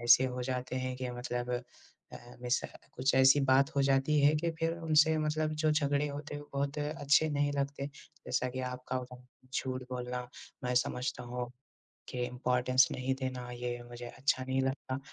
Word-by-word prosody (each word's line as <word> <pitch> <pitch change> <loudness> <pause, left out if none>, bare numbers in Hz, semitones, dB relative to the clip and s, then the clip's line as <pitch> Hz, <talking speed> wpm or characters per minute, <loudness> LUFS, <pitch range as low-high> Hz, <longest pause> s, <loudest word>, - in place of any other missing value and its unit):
ऐसे 120 +2 +7
हो 125 -1 -2
जाते 130 0 -3
हैं 130 0 -2
कि 130 -1 -3
मतलब 120 0 -3 0.6
अ, 120 +1 -11
मिस 125 +1 +2 0.3
कुछ 130 +2 +1
ऐसी 130 +2 +7
बात 135 +1 +5
हो 140 - +3
जाती 135 +2 +3
है 145 +2 +5
कि 170 +2 0
फिर 165 0 +1
उनसे 160 -1 +4
मतलब 155 0 0
जो 155 - +4
झगड़े 145 -1 +2
होते 145 +1 -6
हैं, 145 - -4
वो 145 - -17
बहुत 140 +1 -1
अच्छे 150 +1 +2
नहीं 145 0 +1
लगते, 140 0 -2 0.4
जैसा 125 0 0
कि 130 +1 -4
आपका 125 0 -4
उदाहरण, 125 0 -9 0.3
झूठ 130 -1 -2
बोलना। 125 0 -3 0.4
मैं 125 0 0
समझता 125 0 0
हूँ 125 0 -4 0.6
के 125 -1 -2
इम्पॉर्टेंस 125 +1 +3
नहीं 130 +1 -1
देना, 130 -1 -3
ये 120 0 -4
मुझे 120 0 -8
अच्छा 130 +1 0
नहीं 130 +1 0
लगता 130 0 -2
130 Hz, 180 wpm, -32 LUFS, 125-145 Hz, 0.6 s, ऐसे